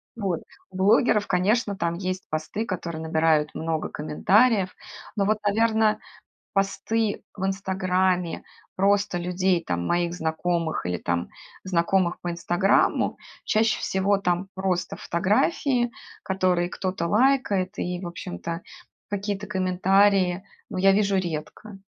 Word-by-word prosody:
Вот. 195 -7 -2 0.3
У 190 - -17
блогеров, 210 +2 +3
конечно, 200 +3 +1
там 170 -2 0
есть 185 +1 -4
посты, 155 +8 -3
которые 170 -5 -4
набирают 160 -1 +1
много 160 -1 -2
комментариев. 195 +6 +2 0.4
Но 200 - +1
вот, 215 +1 +2
наверно, 220 +1 +2 0.5
посты 205 +2 0
в 190 -1 -3
"Инстаграме" 185 -2 0 0.3
просто 200 -1 +2
людей, 180 0 +1
там, 85 -1 -2
моих 175 0 0
знакомых 160 - -1
или 90 0 -1
там 85 0 -2 0.4
знакомых 180 0 +1
по 175 - -3
"Инстаграму"- 175 +3 +2 0.3
чаще 220 +1 +2
всего 195 +1 +1
там 180 0 -1
просто 185 -2 -1
фотографии, 240 - +1 0.3
которые 185 -2 +1
кто-то 185 -1 -3
лайкает, 210 -5 +2
и, 180 0 -2
в 175 - -5
общем-то, 165 - -6 0.5
какие-то 205 0 -3
комментарии, 190 0 +2 0.3
ну, - - -4
я 195 +1 +6
вижу 200 -1 +2
редко. 175 +4 -5
190 Hz, 120 wpm, -25 LUFS, 175-205 Hz, 0.5 s, я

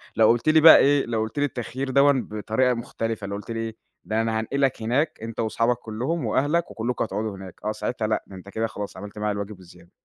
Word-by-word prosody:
لو 110 0 +5
قُلت 120 +5 +3
لي 155 0 +5
بقى 160 +1 +10
إيه، 140 0 +4
لو 115 -2 -1
قُلت 110 +6 -3
لي 145 - +3
التخيّير 130 +1 -4
دوًّا 140 +2 +5 0.2
بطريقة 110 +4 +1
مختلِفة، 115 -3 -4
لو 100 - -4
قُلت 105 +3 -7
لي 115 - -3
إيه، 115 -1 -4 0.3
ده 110 +1 0
أنا 110 -1 0
هانقلك 135 +1 0
هناك 140 +8 0
أنت 115 0 -7
وأصحابك 115 +2 +1
كلّهم 125 +8 -3
وأهلك 145 +9 +1
وكلّكم 120 +2 -2
هتقعدوا 105 -1 -3
هناك، 95 -2 -11
آه، 105 - +1
ساعتها 110 +1 -3
لأ، 110 - 0
ده 95 - -11
أنت 95 +2 -11
كده 110 +2 -1
خلاص 105 -2 -7
عملْت 105 +2 -9
معايا 105 0 0
الواجب 100 -1 -6
وزيادة. 90 -1 -17
115 Hz, 225 wpm, -24 LUFS, 105-130 Hz, 0.3 s, بقى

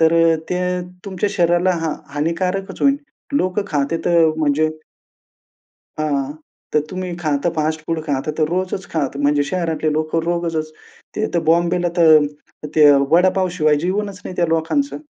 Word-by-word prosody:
तर 160 0 +5 0.4
ते 180 0 0 0.4
तुमच्या 200 0 -2
शरीराला 175 0 +2
हा 160 -2 -1 0.2
हानिकारकच 180 +6 -2
होईल. 280 0 +4 0.4
लोकं 185 -5 +1
खाते 145 +1 0
तर 170 -1 +4
म्हणजे 155 0 +2 1.3
हां, 145 -2 -1 0.4
तर 150 - +3
तुम्ही 185 -1 -4
खात 150 -5 -1
तर 175 - +3
फास्टफूड 155 +1 -1
खा. 140 -4 -1
तर - - 0
तर 155 - +2
रोजच 185 +1 -2
खा. 150 -3 +1
तर - - -6
म्हणजे 145 0 +3
शहरातले 160 -4 -1
लोकं 155 +2 0
रोजचच 165 -2 -2 0.4
ते 215 - 0
तर 170 - +3
बॉम्बेला 175 +1 +2
तर 155 -2 +6 0.5
ते 150 -2 +7 0.2
वडापाव 185 +1 +3
शिवाय 155 -1 +4
जीवनच 200 0 -2
नाही 185 - -7
त्या 170 - +2
लोकांचं. 280 - -1
165 Hz, 150 wpm, -19 LUFS, 155-185 Hz, 1.3 s, ते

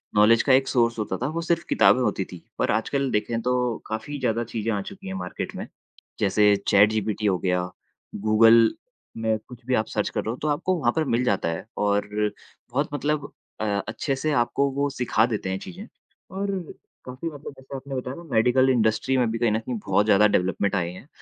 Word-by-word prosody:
Knowledge 110 +2 +5
का 135 - +4
एक 135 0 +4
source 115 -3 +1
होता 95 -3 -2
था, 130 - -2
वो 165 +2 -3
सिर्फ़ 170 0 0
किताबें 130 - +5
होती 100 -5 0
थीं। 90 -1 -11 0.2
पर - - +2
आजकल 135 +5 0
देखें 110 +2 -1
तो 125 -1 0
काफ़ी 110 +7 -5
ज़्यादा 120 -2 0
चीजें 115 0 -1
आ 100 -2 -1
चुकी 95 - -10
हैं 95 - -4
मार्केट 90 -1 -5
में। - - -6 0.5
जैसे 105 +1 +4
चैटजीपीटी 105 +1 +3
हो 95 -3 +3
गया, 90 -1 0 0.5
गूगल 115 +2 +5 0.4
में 110 -1 0
कुछ 125 -1 -13
भी 130 - -1
आप 110 -1 +1
सर्च - - -1
कर - - -2
रहे 110 - -4
हो 125 - -5
तो 155 - -1
आपको 160 +5 0
वहाँ - - +2
पर 160 - +2
मिल 125 - +1
जाता 100 -7 +1
है 85 - -4
और 100 0 +1 0.6
बहुत 145 +4 0
मतलब 145 0 -2 0.3
अ, - - 0 0.2
अच्छे 135 +6 -2
से 155 +3 -1
आपको 140 +3 0
वो 140 +1 0
सिखा 125 -4 +1
देते 110 -5 -3
हैं 95 0 -2
चीजें। 185 +3 -9 0.5
और 200 +1 -3 0.6
काफ़ी 130 +6 -6
मतलब 145 -2 -9
जैसे 130 +1 -10
आपने 135 0 -6
बताया 130 +1 -4
ना 170 - -10
मेडिकल 125 +3 +4
इंडस्ट्री 115 +1 +2
में 120 -2 +2
भी 115 - -2
कहीं 120 -3 +2
न 110 - +1
कहीं 120 +1 -4
बहुत 100 +2 +2
ज़्यादा 105 0 +5
डेवलपमेंट 95 +1 0
आए 85 -3 0
हैं 95 +9 -12
115 Hz, 210 wpm, -24 LUFS, 105-135 Hz, 0.6 s, Knowledge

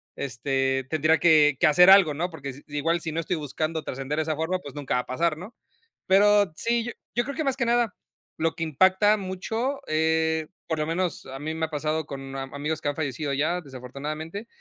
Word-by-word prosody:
este, 135 +1 -1
tendría 155 +1 +3
que 150 -3 +5
que - - +5
hacer 180 +5 +7
algo, 190 -6 +7
¿no? 170 +5 -2
Porque 145 -5 -7
s 140 +2 -10
igual, 150 +4 0
si 165 - -4
no 165 - -1
estoy 170 +1 -2
buscando 155 +2 -3
trascender 135 +2 -4
de 160 - +1
esa 155 0 -2
forma, 165 +4 -1
pues 140 -6 -11
nunca 145 -4 -2
va - - +2
a - - -16
pasar, 155 +4 0
¿no? 205 +7 -10 0.5
Pero 205 0 +5
sí, 235 0 0 0.2
yo 240 - +2
creo 280 +1 -5
que 315 - 0
más 270 -2 +1
que 260 - 0
nada, 235 -2 +1 0.4
lo 160 0 0
que 165 - -3
impacta 190 +7 +4
mucho, 220 +8 -3
eh, 160 0 +1 0.2
por 160 - -1
lo 150 - 0
menos, 170 -1 -2
a 135 0 -7
mí 155 +2 -4
me 160 0 -1
ha - - -20
pasado, 155 +1 -1
con 135 -1 -8
a 135 - -3
amigos, 145 +3 -4
que 145 - -1
han 145 - -3
fallecido 145 -1 -2
ya, 155 +6 0
desafortunadamente. 150 - -7
160 Hz, 220 wpm, -25 LUFS, 145-185 Hz, 0.5 s, hacer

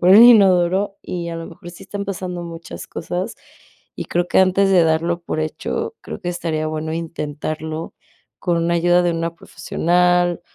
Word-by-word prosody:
por 180 - +3
el 205 +4 +10
inodoro, 195 -4 +5
y 170 -1 -4
a 165 - -4
lo 165 - -6
mejor 170 +1 -11
sí 175 - -13
están 200 -1 -5
pasando 180 -2 -4
muchas 165 -1 -8
cosas, 180 +2 -4 0.6
y - - -4
creo 175 0 -1
que - - +3
antes 190 +1 +4
de 180 -3 +5
darlo 165 +2 +1
por 155 - -3
hecho, 450 - -3
creo - - -7
que 175 - -4
estaría 165 -3 -2
bueno 155 0 -3
intentarlo 155 0 -5 0.4
con 175 -2 0
una 170 +1 +1
ayuda 175 +1 +3
de 175 - +2
una 165 0 -2
profesional 175 +1 +1
175 Hz, 175 wpm, -20 LUFS, 165-180 Hz, 0.6 s, el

